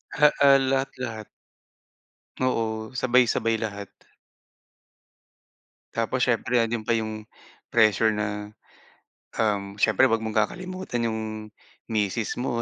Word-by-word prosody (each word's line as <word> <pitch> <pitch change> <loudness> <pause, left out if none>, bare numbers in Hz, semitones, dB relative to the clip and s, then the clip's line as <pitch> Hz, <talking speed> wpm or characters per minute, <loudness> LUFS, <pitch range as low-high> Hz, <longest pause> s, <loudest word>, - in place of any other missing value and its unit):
Ah, 150 0 +6
ah, 140 -1 +8
lahat-lahat. 130 -5 -3 1.1
Oo, 110 -2 -1
sabay-sabay 120 -2 +2
lahat. 100 -3 -5 2.1
Tapos 115 +3 -1
siyempre 120 0 +1
nando'n 115 -1 0
pa 115 - +1
yung 110 -1 -4 0.5
pressure 110 -1 +4
na, 105 0 -3 0.8
um, 100 -2 -1
siyempre 110 +5 +4
wag 115 -2 0
mong 110 0 -3
kakalimutan 180 - -2
yung 110 -1 -2 0.7
misis 110 +1 -1
mo, 120 -2 -1
115 Hz, 100 wpm, -25 LUFS, 110-125 Hz, 2.1 s, ah